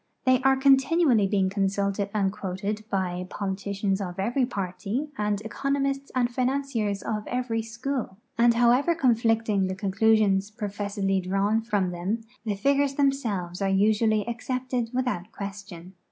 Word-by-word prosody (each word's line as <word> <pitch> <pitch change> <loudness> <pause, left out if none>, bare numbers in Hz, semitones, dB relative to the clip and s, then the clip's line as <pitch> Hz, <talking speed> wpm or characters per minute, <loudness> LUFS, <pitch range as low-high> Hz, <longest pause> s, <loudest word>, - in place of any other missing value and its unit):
They 255 0 +4
an? 265 0 +3
continually 270 - +4
being 190 -1 +1
consulted 200 0 0
and 200 -2 +1
quoted 200 +1 -4
by 180 -2 -2
politicians 200 0 -2
of 180 -2 -5
every 240 +6 +1
party 205 +7 -3
and 210 -2 -1
economists 275 +4 -2
and 250 -1 +3
financiers 250 -6 -1
of 210 -1 -3
every 245 -2 -1
school, 230 -1 -4 0.2
and 235 0 +4
however 245 +8 +4
conflicting 225 - +2
the 185 - -3
conclusions 200 0 +2
j^rofessedly 200 -2 -2
drawn 195 +4 +1
from 205 -5 0
them, 185 +6 -2 0.2
the 210 -3 -1
figures 280 +6 +1
themselves 225 -11 0
are 195 - +1
usually 215 +2 +2
accepted 245 0 -2
without 250 -8 -2
ijiiestion. 195 -3 -8
215 Hz, 135 wpm, -26 LUFS, 195-250 Hz, 0.2 s, They